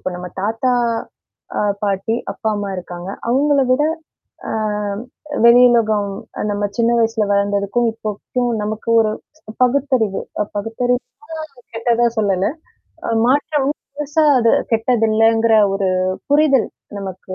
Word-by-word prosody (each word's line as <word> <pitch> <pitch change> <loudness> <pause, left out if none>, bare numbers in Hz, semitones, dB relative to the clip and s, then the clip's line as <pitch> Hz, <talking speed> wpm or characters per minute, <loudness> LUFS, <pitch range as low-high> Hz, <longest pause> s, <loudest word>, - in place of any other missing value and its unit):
இப்ப 185 - -4
நம்ம 180 0 -7
தாத்தா, 225 +5 0 0.9
அ - - +1 0.2
பாட்டி, 200 +2 0 0.2
அப்பா, 220 - -3
அம்மா 205 -1 -3
இருக்காங்க. 175 0 -7 0.2
அவுங்கள 280 +2 +3
விட 270 - +2 0.7
ஆ - - -3 0.9
வெளியுலகம் 235 -4 +5 0.4
நம்ம 205 0 -2
சின்ன 235 0 +3
வயசுல 225 -1 +1
வளந்ததுக்கும் 200 +3 +1
இப்போக்கும் 225 +3 -3
நமக்கு 215 +2 -4
ஒரு 220 -1 +2 0.5
பகுத்தறிவு 250 -5 +1 0.2
அ - - 0
பகுத்தறிவுனா 245 +5 -2 0.6
கெட்டதா 235 +1 +2
சொல்லல. 195 -2 +1 0.6
அ - - 0
மாற்றம். 285 +1 +1 0.3
பெருசா 295 +2 +1
அது 230 -1 +3 0.2
கெட்டதில்லங்கிற 225 -1 +3 0.2
ஒரு 195 -1 0 0.4
புரிதல் 285 -3 +3 0.3
நமக்கு 190 -1 -7
225 Hz, 110 wpm, -19 LUFS, 205-245 Hz, 0.9 s, வெளியுலகம்